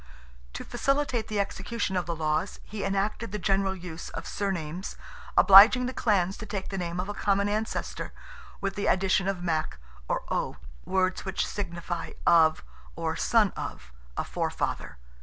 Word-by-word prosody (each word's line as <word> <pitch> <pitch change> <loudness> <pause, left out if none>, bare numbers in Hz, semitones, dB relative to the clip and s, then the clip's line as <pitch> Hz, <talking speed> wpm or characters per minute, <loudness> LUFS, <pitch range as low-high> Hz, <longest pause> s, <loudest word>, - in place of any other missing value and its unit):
To - - -6
facilitate 275 -4 0
the 210 -1 -2
execution 200 +1 -2
of 180 -3 -1
the 170 - -2
laws 155 +4 -1
he 210 -1 -6
enacted 200 +3 -1
the 210 - -2
general 195 -1 +1
use 175 -3 -7
of 165 - -6
surnames, 185 -2 -3 0.4
obliging 215 +6 +9
the 255 - -3
clans 195 -6 +1
to 220 - -7
take 195 -1 -4
the 195 - -4
name 175 0 -3
of 185 - -2
a 205 - -3
common 200 0 +1
ancestor, 215 +2 -3 0.5
with 195 0 -1
the 205 - -2
addition 190 0 +2
of 190 -3 -2
"Mac," 155 - -1 0.3
or - - -1
"O"—words 185 - -2
which 190 0 -1
signify 170 -3 -4
"of," 160 - +5 0.3
or - - -2
"son - - +3
of," 60 +1 -7 0.3
a - - 0
forefather. - - -3
195 Hz, 160 wpm, -28 LUFS, 175-205 Hz, 0.5 s, obliging